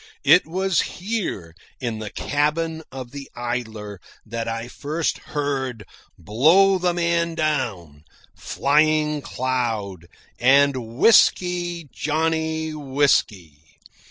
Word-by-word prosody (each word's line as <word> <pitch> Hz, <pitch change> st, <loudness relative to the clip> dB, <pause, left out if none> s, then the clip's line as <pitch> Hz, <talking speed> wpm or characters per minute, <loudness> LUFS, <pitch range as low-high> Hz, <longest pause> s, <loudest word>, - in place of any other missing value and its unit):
It 180 Hz, -, +5 dB
was 190 Hz, +2 st, +1 dB
here, 180 Hz, -, -4 dB, 0.3 s
in 115 Hz, -4 st, -3 dB
the 110 Hz, -1 st, -5 dB
cabin 160 Hz, +5 st, -1 dB
of 130 Hz, -2 st, -8 dB
the 140 Hz, 0 st, -9 dB
Idler, 110 Hz, -5 st, -5 dB, 0.2 s
that 115 Hz, +1 st, -5 dB
I 115 Hz, +1 st, -4 dB
first 150 Hz, +6 st, -3 dB, 0.2 s
heard 130 Hz, -6 st, -2 dB, 0.3 s
"Blow 160 Hz, -, +4 dB
the 180 Hz, 0 st, +1 dB
Man 170 Hz, -1 st, 0 dB
Down," 110 Hz, -, -2 dB, 0.3 s
"Flying 150 Hz, +1 st, +1 dB
Cloud," 115 Hz, -10 st, -3 dB, 0.3 s
and 130 Hz, -2 st, +3 dB
"Whisky, 175 Hz, -4 st, +3 dB
Johnny, 160 Hz, +1 st, -1 dB
Whisky." 130 Hz, -, 0 dB
140 Hz, 100 wpm, -22 LUFS, 115-160 Hz, 0.3 s, It